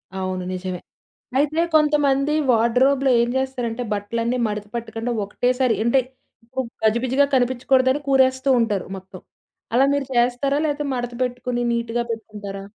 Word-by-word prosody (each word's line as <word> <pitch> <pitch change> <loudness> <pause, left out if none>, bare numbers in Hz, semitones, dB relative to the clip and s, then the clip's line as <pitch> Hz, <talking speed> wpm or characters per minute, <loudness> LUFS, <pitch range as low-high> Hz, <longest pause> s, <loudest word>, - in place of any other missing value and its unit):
అవును 185 -1 -3
నిజమే. 185 -1 -4 0.6
అయితే 300 +3 +2
కొంతమంది 295 -2 +3 0.2
వాడ్రో‌బ్‌లో 255 +4 +3
ఏం 235 - 0
జేస్తారంటే, 250 -3 -2
బట్టలన్నీ 230 +4 -2
మడత 210 -1 -4
పట్టకుండా 235 0 -4
ఒకటేసారి 250 +4 +1
అంటే 235 +3 +3 0.6
ఉప్ 240 -3 -3
గజిబిజిగా 245 +5 +3
కనిపించకూడదని 260 +2 +2
కూరేస్తూ 260 0 +3
ఉంటారు 210 -4 0
మొత్తం. 190 -1 -12 0.5
అలా 265 +3 +5
మీరు 285 -1 0
చేస్తారా? 245 +4 +2
లేపోతే 295 -1 -1
మడత 245 -1 -4
పెట్టుకొని, 250 0 -3
నీట్‌గా 235 0 -1
పెట్టుకుంటారా? 205 -3 -7
245 Hz, 120 wpm, -22 LUFS, 225-265 Hz, 0.6 s, అలా